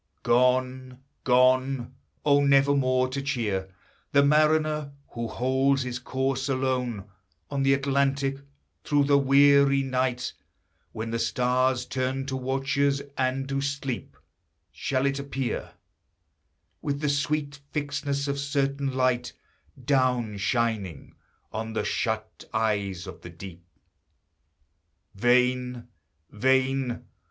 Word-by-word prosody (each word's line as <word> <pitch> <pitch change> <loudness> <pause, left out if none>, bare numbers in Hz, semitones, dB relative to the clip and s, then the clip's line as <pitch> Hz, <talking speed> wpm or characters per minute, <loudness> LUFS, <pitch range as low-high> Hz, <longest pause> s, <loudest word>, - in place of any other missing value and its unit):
Gone, 125 +1 +1 0.3
gone! 130 0 +3 0.3
Oh, 145 -1 +4
never 140 0 +4
more 130 -1 +2
to 135 +1 -3
cheer 105 -9 -2 0.4
The 140 0 +6
mariner 150 0 +2 0.2
who 115 0 -4
holds 130 +3 +1
his 125 -1 -4
course 130 +2 -2
alone 125 -6 -1 0.4
On 140 - -1
the 135 0 +4
Atlantic, 140 0 0 0.4
through 145 -1 +2
the 140 0 +4
weary 140 0 +5
night, 130 -1 -1 0.6
When 115 +1 -5
the 115 - -1
stars 125 +2 +1
turn 130 +1 -2
to 135 -1 -3
watchers, 135 +2 0
and 130 +1 0
do 135 0 -2
sleep, 140 -3 -4 0.5
Shall 130 0 -1
it 140 0 0
appear, 135 -2 -4 1.1
With 140 -1 -2
the 150 - 0
sweet 145 0 -1
fixedness 145 -1 -2
of 140 0 -2
certain 140 0 -1
light, 125 -1 +1 0.5
Down 125 -5 +1
shining 100 - -2 0.4
on 110 0 -4
the 110 - -1
shut 110 -1 -2
eyes 100 -5 -1
of - - -10
the 90 - -9
deep. 85 0 -11 1.5
Vain, 125 +2 +1 0.4
vain! 130 +2 +1
130 Hz, 110 wpm, -26 LUFS, 125-140 Hz, 1.5 s, The